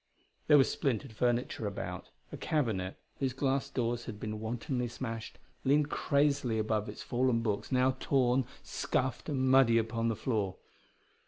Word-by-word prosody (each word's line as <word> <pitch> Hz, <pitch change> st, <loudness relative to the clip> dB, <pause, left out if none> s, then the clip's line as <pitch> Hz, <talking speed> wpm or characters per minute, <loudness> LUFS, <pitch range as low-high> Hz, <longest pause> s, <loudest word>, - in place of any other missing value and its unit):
There 150 Hz, -, +8 dB
was 135 Hz, -, +5 dB
splintered 115 Hz, -5 st, -1 dB
furniture 120 Hz, -1 st, 0 dB
about. 100 Hz, -, -5 dB, 0.2 s
A -, -, -5 dB
cabinet, 110 Hz, -11 st, -1 dB, 0.2 s
whose 135 Hz, -2 st, 0 dB
glass 135 Hz, +1 st, 0 dB
doors 120 Hz, -1 st, -1 dB
had 105 Hz, -3 st, -7 dB
been 110 Hz, 0 st, -4 dB
wantonly 120 Hz, +3 st, -2 dB
smashed, 115 Hz, -2 st, -6 dB, 0.3 s
leaned 145 Hz, +2 st, +3 dB
crazily 140 Hz, -5 st, +2 dB
above 110 Hz, -1 st, 0 dB
its 105 Hz, -, -7 dB
fallen 125 Hz, -1 st, +1 dB
books, 105 Hz, +1 st, -2 dB
now 130 Hz, 0 st, +3 dB
torn, 130 Hz, -1 st, +2 dB, 0.2 s
scuffed 130 Hz, +4 st, -2 dB
and 130 Hz, -3 st, +1 dB
muddy 130 Hz, -3 st, +6 dB
upon 115 Hz, 0 st, 0 dB
the 115 Hz, -, +1 dB
floor. 105 Hz, -6 st, -1 dB
120 Hz, 150 wpm, -32 LUFS, 110-130 Hz, 0.3 s, There